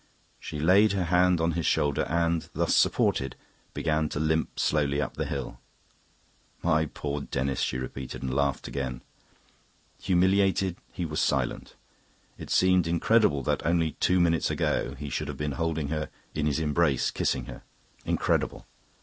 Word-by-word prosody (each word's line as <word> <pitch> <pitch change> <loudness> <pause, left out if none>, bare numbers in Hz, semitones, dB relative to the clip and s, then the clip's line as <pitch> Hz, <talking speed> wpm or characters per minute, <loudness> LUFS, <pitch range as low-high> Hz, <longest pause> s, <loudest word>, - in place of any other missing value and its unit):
She 75 - -6
laid 95 +6 +5
her 95 -2 0
hand 90 +1 +3
on 80 +1 +1
his 85 0 -1
shoulder 75 +1 +1
and, 85 0 0
thus - - +1
supported, 65 -2 +2 0.4
began 80 -1 0
to - - -3
limp 80 +1 0
slowly 70 -2 +1
up 75 - -3
the 80 -1 -2
hill. 70 -5 -5 1.0
"My 80 0 +2
poor 75 -1 -4
Denis!" 65 0 -2
she 65 - 0
repeated, 65 +1 -6
and 65 -1 -2
laughed 70 0 0
again. 65 -2 -4 1.0
Humiliated, 95 0 +2
he - - -4
was - - -2
silent. 65 -3 -1 0.6
It - - -8
seemed 95 -2 +3
incredible 85 - +3
that, - - -1
only 85 -1 +1
two 90 +1 +3
minutes 85 -2 +2
ago, - - -1
he 75 -2 -7
should 75 - -2
have 70 -2 -5
been 75 +1 -2
holding 80 +1 -2
her 75 0 -2 0.2
in 75 -1 -1
his 75 - 0
embrace, 75 -2 +1
kissing 65 -2 -1
her. - - -9 0.4
Incredible. - - -1
80 Hz, 155 wpm, -27 LUFS, 70-85 Hz, 1.0 s, laid